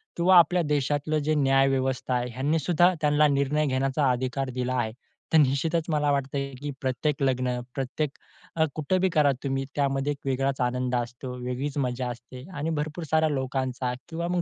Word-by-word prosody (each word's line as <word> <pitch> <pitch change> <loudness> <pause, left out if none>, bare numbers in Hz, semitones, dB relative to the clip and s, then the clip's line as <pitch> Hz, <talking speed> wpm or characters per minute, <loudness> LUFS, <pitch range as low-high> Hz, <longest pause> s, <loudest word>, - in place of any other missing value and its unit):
किंवा 180 +1 +5
आपल्या 175 +2 +5
देशातलं 145 +2 0
जे 155 - +1
न्याय 135 -1 +4
व्यवस्था 130 -1 0
आहे 125 0 -1
ह्यांनी 145 +6 0
सुद्धा 175 +4 +3
त्यांना 150 0 +4
निर्णय 140 +2 +1
घेण्याचा 135 +1 +1
अधिकार 130 +2 -2
दिला 125 0 -1
आहे. 115 -3 0 0.4
तर 160 - +7
निश्चितच 150 +4 +2
मला 150 -2 +1
वाटतं 140 0 -1
आहे, 140 0 -3
की 145 +3 -6
प्रत्येक 135 +3 -1
लग्न 125 -2 0 0.2
प्रत्येक 135 +2 -2 0.5
अ, 160 - +3
कुठं 160 +5 0
बी 190 - +3
करा 145 -2 +4
तुम्ही 135 -1 -1
त्यामध्ये 140 0 0
एक 140 - -4
वेगळाच 135 0 0
आनंद 125 0 0
असतो, 120 +1 -4
वेगळीच 135 +4 -3
मजा 125 -2 -1
असते 125 +2 -9
आणि 150 +3 -2
भरपूर 155 +3 -3
साऱ्या 160 0 +2
लोकांचा 130 -2 -2 0.2
किंवा 170 +1 -3
मग 180 0 0
140 Hz, 180 wpm, -26 LUFS, 130-150 Hz, 0.5 s, तर